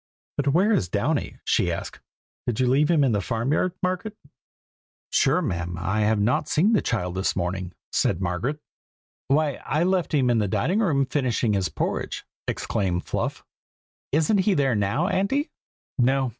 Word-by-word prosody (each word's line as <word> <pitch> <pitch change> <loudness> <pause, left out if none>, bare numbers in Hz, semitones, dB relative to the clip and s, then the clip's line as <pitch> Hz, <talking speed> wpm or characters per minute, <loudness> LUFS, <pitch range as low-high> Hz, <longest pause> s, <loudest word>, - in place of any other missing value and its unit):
"But 145 - 0
where 180 +10 +3
is 95 - +1
Downy?" - - -1
she - - +2
asked; - - -5 0.5
"did 120 -3 -1
you 130 - +3
leave 140 +4 +3
him 160 -4 +4
in 135 - +3
the 105 -2 +1
farm 115 +7 -1
yard, 175 +3 +1
Margaret?" 185 +4 -2 0.9
"Sure, 150 +7 +3
ma'am, 85 - -3
I 95 +4 -1
have 105 0 +2
not 125 +9 +1
seen 195 +9 +3
the 210 - +4
child 90 -6 -2
this 95 +1 -1
morning!" 90 0 -3 0.2
said 85 - +1
Margaret. 95 - -2 0.7
"Why, 145 0 +1
I 150 +4 0
left 185 -1 +1
him 130 -4 +3
in 115 - +3
the 105 - +1
dining 180 - +1
room, 145 -11 +2
finishing 125 -5 0
his 95 -2 0
porridge!" - - -3 0.2
exclaimed 90 -3 -1
Fluff. - - -3 0.7
"Isn't 160 +8 +3
he 195 0 +2
there 135 -3 +2
now, 110 - +1
Auntie?" 220 - 0 0.5
"No!" 130 +1 +3
135 Hz, 170 wpm, -25 LUFS, 100-165 Hz, 0.9 s, him